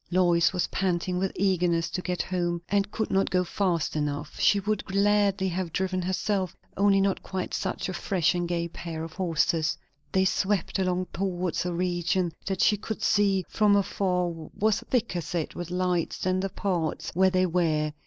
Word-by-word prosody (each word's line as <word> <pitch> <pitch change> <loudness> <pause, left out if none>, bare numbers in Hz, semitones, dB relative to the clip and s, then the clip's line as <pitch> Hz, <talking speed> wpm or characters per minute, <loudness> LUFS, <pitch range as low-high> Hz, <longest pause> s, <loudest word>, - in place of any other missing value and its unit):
Lois 175 -1 +3
was 180 -2 0
panting 180 -1 -1
with 190 0 0
eagerness 175 -4 +1
to 180 - -2
get 180 -2 -2
home, 175 -2 -1
and 200 0 +1
could 220 +1 -3
not 195 0 +2
go 180 0 +2
fast 175 -4 -1
enough; 150 0 -3
she 205 - +4
would 210 +2 -1
gladly 200 -1 +2
have 180 -1 -2
driven 185 +1 -1
herself, 190 0 -1 0.2
only 200 0 +4
not 195 -1 +1
quite 190 -1 -4
such - - -2
a 185 - -3
fresh 180 -2 +1
and 175 -1 -1
gay 170 -1 -1
pair 165 -1 -6
of 165 0 -7
horses. 165 -2 +1 0.3
They 190 0 +3
swept 190 0 0
along 185 -1 0
towards 180 -2 -1
a - - -1
region 175 0 0 0.2
that 190 -2 -1
she 210 - +4
could 215 +1 -5
see 195 -3 +3
from 210 -2 +3
afar 185 -2 +1 0.3
was 215 0 +3
thicker 215 -8 -1
set 170 -1 -3
with 175 -1 -6
lights 180 -2 0
than 185 0 0
the 195 +1 -1
parts 175 -5 -2
where 190 +2 +4
they 185 0 +2
were. 160 -4 +1
185 Hz, 180 wpm, -27 LUFS, 175-195 Hz, 0.3 s, she